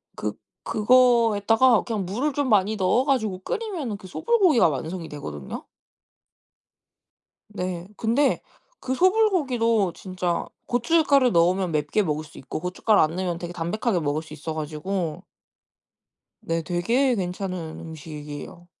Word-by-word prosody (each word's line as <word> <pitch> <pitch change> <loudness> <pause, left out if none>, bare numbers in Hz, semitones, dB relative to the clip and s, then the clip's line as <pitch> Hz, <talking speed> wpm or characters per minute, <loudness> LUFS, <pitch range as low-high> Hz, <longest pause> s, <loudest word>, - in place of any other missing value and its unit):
그 105 - -2 0.3
그거에다가 230 0 +4
그냥 215 -5 -3
물을 245 +11 -1
좀 285 0 0
많이 210 0 +3
넣어 195 +6 +2
가지고 220 -9 0
끓이면은 315 - -4
그 190 - -12
소불고기가 365 - +3
완성이 160 +4 -4
되거든요. 75 - -7 1.8
네. 180 -3 -5
근데 245 +6 +2 0.4
그 260 - -2
소불고기도 265 - +2
진짜 180 -1 -3 0.2
고춧가루 275 +1 +3
넣으면 180 0 +2
맵게 150 +7 +1
먹을 155 -4 -2
수 155 - -14
있고 135 - -6
고춧가루 185 +4 +2
안 155 +2 +2
넣으면 180 -2 -2
되게 175 0 -6
담백하게 180 +4 -1
먹을 150 0 -1
수 160 - -13
있어 160 +1 -5
가지고 155 +2 -3 1.2
네. 165 0 -1
되게 230 - +1
괜찮은 180 -3 -4
음식이에요. 155 +1 -9
190 Hz, 295 characters per minute, -24 LUFS, 165-245 Hz, 1.8 s, 그거에다가